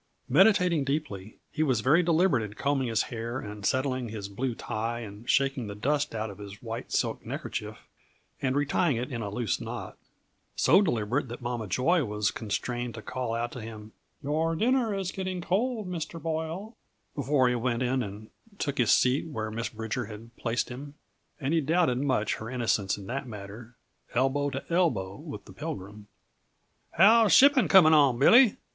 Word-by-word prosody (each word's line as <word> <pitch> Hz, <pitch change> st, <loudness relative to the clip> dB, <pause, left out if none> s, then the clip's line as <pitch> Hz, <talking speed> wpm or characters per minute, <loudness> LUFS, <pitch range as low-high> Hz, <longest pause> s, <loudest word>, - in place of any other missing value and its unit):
Meditating 180 Hz, -, +4 dB
deeply, 135 Hz, -9 st, -4 dB
he 155 Hz, -, -3 dB
was 130 Hz, -7 st, +2 dB
very 145 Hz, +9 st, +4 dB
deliberate 170 Hz, -5 st, +3 dB
in 105 Hz, -1 st, -6 dB
combing 140 Hz, -1 st, 0 dB
his 115 Hz, -2 st, +1 dB
hair 115 Hz, +2 st, -4 dB
and 105 Hz, -2 st, -8 dB
settling 130 Hz, -2 st, 0 dB
his 105 Hz, -2 st, -6 dB
blue 120 Hz, +4 st, -3 dB
tie 115 Hz, +1 st, -3 dB
and 105 Hz, +2 st, -10 dB
shaking 135 Hz, -4 st, +1 dB
the 100 Hz, -, -6 dB
dust 145 Hz, +4 st, -1 dB
out 110 Hz, -1 st, -3 dB
of 100 Hz, -, -13 dB
his 100 Hz, 0 st, -9 dB
white 115 Hz, 0 st, -6 dB
silk -, -, -1 dB
neckerchief -, -, -5 dB, 0.6 s
and 130 Hz, -1 st, 0 dB
retying 145 Hz, +1 st, +1 dB
it 125 Hz, +3 st, -4 dB
in 120 Hz, -2 st, -4 dB
a 105 Hz, -, -3 dB
loose 105 Hz, -3 st, -2 dB
knot; -, -, -7 dB, 0.6 s
so 195 Hz, -, +5 dB
deliberate 125 Hz, -, 0 dB
that 120 Hz, +1 st, -7 dB
Mama 120 Hz, -3 st, -3 dB
Joy 150 Hz, -, +2 dB
was 105 Hz, -3 st, -1 dB
constrained 120 Hz, +2 st, -3 dB
to 110 Hz, -, -8 dB
call 125 Hz, -3 st, -3 dB
out 120 Hz, +1 st, -2 dB
to 125 Hz, -, -7 dB
him: 110 Hz, -1 st, -9 dB, 0.3 s
"Your 160 Hz, +3 st, 0 dB
dinner 240 Hz, +4 st, +2 dB
is 190 Hz, -2 st, -2 dB
getting 185 Hz, -1 st, -4 dB
cold, 210 Hz, +4 st, -1 dB
Mr. 165 Hz, -2 st, -5 dB
Boyle," 165 Hz, +7 st, -4 dB, 0.4 s
before 140 Hz, -2 st, +2 dB
he 125 Hz, -, +2 dB
went 120 Hz, 0 st, -1 dB
in 130 Hz, +1 st, +1 dB
and 105 Hz, 0 st, -7 dB, 0.3 s
took 140 Hz, -6 st, -3 dB
his 120 Hz, -3 st, +4 dB
seat 130 Hz, +5 st, +3 dB
where 110 Hz, -8 st, -4 dB
Miss 115 Hz, +1 st, -3 dB
Bridger 110 Hz, +2 st, -4 dB
had 115 Hz, +2 st, -11 dB
placed 115 Hz, +1 st, -2 dB
him 140 Hz, +4 st, -8 dB, 0.4 s
and 140 Hz, +2 st, -1 dB
he 165 Hz, -, +3 dB
doubted 155 Hz, -4 st, +2 dB
much 130 Hz, -6 st, 0 dB
her 110 Hz, -, -7 dB
innocence 115 Hz, -6 st, 0 dB
in 100 Hz, -, -9 dB
the 130 Hz, +6 st, -3 dB
matter 110 Hz, +1 st, -9 dB, 0.4 s
elbow 135 Hz, +3 st, +1 dB
to 135 Hz, 0 st, -5 dB
elbow 120 Hz, -, 0 dB
with -, -, -9 dB
the -, -, -13 dB
Pilgrim. 105 Hz, +2 st, -7 dB, 0.8 s
"How's 220 Hz, +4 st, +6 dB
shipping 270 Hz, -, +6 dB
coming 160 Hz, -2 st, +7 dB
on, 140 Hz, -5 st, +5 dB
Billy?" 230 Hz, -, +6 dB
125 Hz, 175 wpm, -28 LUFS, 110-155 Hz, 0.8 s, coming